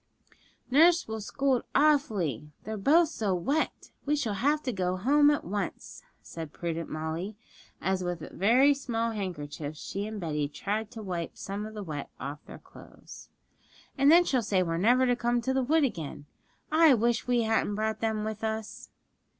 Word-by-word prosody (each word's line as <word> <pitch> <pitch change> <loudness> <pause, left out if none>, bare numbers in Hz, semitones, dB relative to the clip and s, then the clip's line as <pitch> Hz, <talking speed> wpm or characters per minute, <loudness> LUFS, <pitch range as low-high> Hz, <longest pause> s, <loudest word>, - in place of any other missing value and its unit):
'Nurse 330 +5 +5
will 220 0 -4
scold 265 +4 0
awfully, 210 - +2
they're 220 +1 -4
both 305 - +4
so 210 - -1
wet; 275 - -2
we 295 +1 +1
shall 255 -8 -1
have 290 +8 +1
to 255 - -1
go 185 -1 -1
home 290 +8 +4
at 295 - +1
once,' 200 +3 -5 0.2
said 160 -3 -8
prudent 165 0 -4
Molly, 160 +6 -4 0.4
as 190 0 -1
with 175 -3 -4
very 250 +9 +4
small 230 -4 -2
handkerchiefs 155 -7 -5
she 200 +2 -4
and 215 -1 -6
Betty 150 -4 -1
tried 210 +8 -3
to 220 0 -9
wipe 175 -4 -4
some 200 +2 -5
of 220 - -11
the 210 - -5
wet 150 -5 -6
off 145 +2 -6
their - - -9
clothes. - - -14 0.7
'And 280 +1 +5
then 350 +2 +7
she'll 260 -6 +1
say 195 -4 +1
we're 165 -1 -2
never 245 +6 +4
to 245 -1 +2
come 240 0 0
to 265 +3 -1
the 265 - +2
wood 305 +5 +2
again. 160 - -3 0.5
I 315 -3 +6
wish 235 +1 0
we 245 -1 +2
hadn't 220 -2 +1
brought 220 0 -1
them 220 -1 -1
with 220 0 -5
us!' 220 0 -4
220 Hz, 175 wpm, -28 LUFS, 180-260 Hz, 0.7 s, then